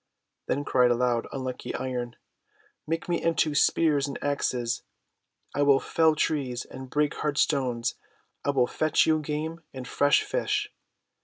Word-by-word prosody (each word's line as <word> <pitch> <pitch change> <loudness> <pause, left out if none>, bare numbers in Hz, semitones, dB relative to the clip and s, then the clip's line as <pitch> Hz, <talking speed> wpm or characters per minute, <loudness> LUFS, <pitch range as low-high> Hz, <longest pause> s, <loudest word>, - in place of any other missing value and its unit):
Then 145 +2 -1
cried 125 -1 +4
aloud 120 -1 +1
unlucky 130 -2 -4
Iron: 125 -2 -3 0.4
— - - -37
:'Make 165 +1 -2
me 175 -1 0
into 165 -2 +1
spears 145 -1 +3
and 140 - -5
axes. 125 -4 -1 0.7
I 145 - 0
will 140 -1 +5
fell 160 +1 +2
trees 135 -5 -1
and 130 -1 -9
break 150 +2 +1
hard 150 -2 -1
stones. 125 -6 +1 0.5
I - - -1
will 135 -3 +3
fetch 155 +4 +2
you 155 -1 +3
game 155 +2 -4
and 130 -1 -6
fresh 145 0 +3
fish. 420 -3 -1
145 Hz, 150 wpm, -27 LUFS, 125-155 Hz, 0.7 s, will